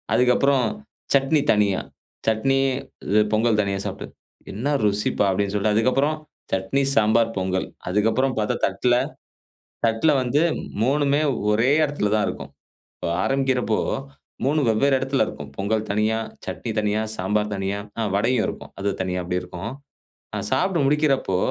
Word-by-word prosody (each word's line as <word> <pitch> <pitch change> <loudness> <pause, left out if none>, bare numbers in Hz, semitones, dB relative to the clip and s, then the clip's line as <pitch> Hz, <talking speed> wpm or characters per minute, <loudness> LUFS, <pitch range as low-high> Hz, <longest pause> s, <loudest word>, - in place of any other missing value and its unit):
அதுக்கப்புறம் 125 +1 +3 0.5
சட்னி 140 +2 +3
தனியா, 105 -2 +2 0.5
சட்னி 125 +5 +2 0.5
இது 105 +2 +4
பொங்கல் 110 0 +3
தனியா 100 -1 -2
சாப்புட்டு. - - -6 0.4
"என்ன 135 +9 -1
ருசிப்பா!" 105 0 +1
அப்பிடீன்னு 100 +1 0
சொல்லிட்டு 105 +1 +1
அதுக்கப்புறம் 135 +7 +2 0.4
சட்னி, 95 +9 0
சாம்பார், 110 +1 +3
பொங்கல். 95 0 -1 0.2
அதுக்கப்புறம் 110 +7 +1
பார்த்தா 105 -1 0
தட்டுல, 110 +6 +1 0.9
தட்டுல 115 +7 +3
வந்து 130 +4 +1 0.4
3 145 +4 +2
மே, 145 - +3 0.3
ஒரே 115 +5 +3
இடத்துல 145 -8 -1
தான் 105 - +2
இருக்கும். 70 0 -6 0.5
இப்ப - - -5 0.2
ஆரம்பிக்கிறப்போ 130 -4 +1 0.7
3 150 +4 +2
ம் 140 - +1
வெவ்வேற 135 +6 +3
இடத்துல 135 0 +1
இருக்கும். 75 -1 -8
பொங்கல் 110 +2 -1
தனியா, 110 +2 +1 0.3
சட்னி - - -4
தனியா, 105 0 +1 0.2
சாம்பார் 105 +3 0
தனியா, 95 +1 -2 0.2
ஆ - - 0
வடையும் 115 +3 +2
இருக்கும். - - -7
அது 100 +1 0
தனியா 90 0 -2
அப்பிடி 90 +1 -2
இருக்கும். 90 +4 -6 0.6
நான் 105 0 -3
சாப்டு 170 +3 +1
முடிக்கிறப்போ, 140 -9 +2
110 Hz, 140 wpm, -23 LUFS, 100-135 Hz, 0.9 s, இது